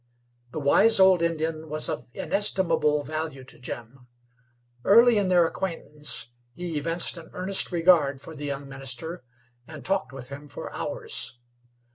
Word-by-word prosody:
The 155 Hz, -, -5 dB
wise 195 Hz, +10 st, +5 dB
old 190 Hz, -2 st, +6 dB
Indian 160 Hz, -1 st, -2 dB
was 155 Hz, +1 st, +3 dB
of 120 Hz, -, -4 dB
inestimable 165 Hz, -7 st, +1 dB
value 155 Hz, -3 st, -5 dB
to 130 Hz, -, -13 dB
Jim. 125 Hz, +1 st, -8 dB, 0.8 s
Early 230 Hz, +2 st, +6 dB
in 200 Hz, -, 0 dB
their 180 Hz, -2 st, +5 dB
acquaintance 150 Hz, -7 st, -3 dB, 0.3 s
he 175 Hz, -2 st, -5 dB
evinced 165 Hz, +3 st, +2 dB
an 165 Hz, -, -11 dB
earnest 190 Hz, +2 st, -1 dB
regard 165 Hz, -6 st, +3 dB
for 160 Hz, +4 st, -11 dB
the 145 Hz, 0 st, -6 dB
young 140 Hz, 0 st, -5 dB
minister, 135 Hz, +4 st, -5 dB, 0.4 s
and 155 Hz, -2 st, -10 dB
talked 190 Hz, -8 st, -1 dB
with 135 Hz, -1 st, -9 dB
him 140 Hz, +1 st, -9 dB
for 140 Hz, -, -8 dB
hours. 120 Hz, -, -3 dB
155 Hz, 145 wpm, -26 LUFS, 140-180 Hz, 0.8 s, old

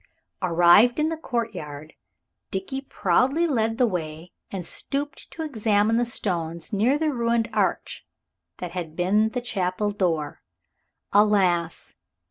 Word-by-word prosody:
Arrived 180 Hz, -, +5 dB
in 305 Hz, +1 st, +2 dB
the 325 Hz, -, -2 dB
courtyard, 160 Hz, -, -5 dB, 0.6 s
Dickie 205 Hz, +7 st, -4 dB
proudly 255 Hz, -, +2 dB
led 225 Hz, -7 st, 0 dB
the 250 Hz, -, +4 dB
way 165 Hz, -4 st, -4 dB, 0.2 s
and 185 Hz, -3 st, -5 dB
stooped 280 Hz, +6 st, -4 dB
to 320 Hz, -, -6 dB
examine 220 Hz, -5 st, +1 dB
the 240 Hz, -, +2 dB
stones 170 Hz, -5 st, -2 dB
near 230 Hz, +8 st, +3 dB
the 310 Hz, -1 st, 0 dB
ruined 235 Hz, -1 st, 0 dB
arch -, -, -1 dB, 0.5 s
that 180 Hz, -2 st, -6 dB
had 170 Hz, -3 st, -5 dB
been 205 Hz, +5 st, +2 dB
the 250 Hz, +2 st, -3 dB
chapel 205 Hz, -3 st, -1 dB
door. 170 Hz, -7 st, -1 dB, 0.7 s
Alas! 190 Hz, -5 st, +2 dB
210 Hz, 125 wpm, -24 LUFS, 175-240 Hz, 0.7 s, Arrived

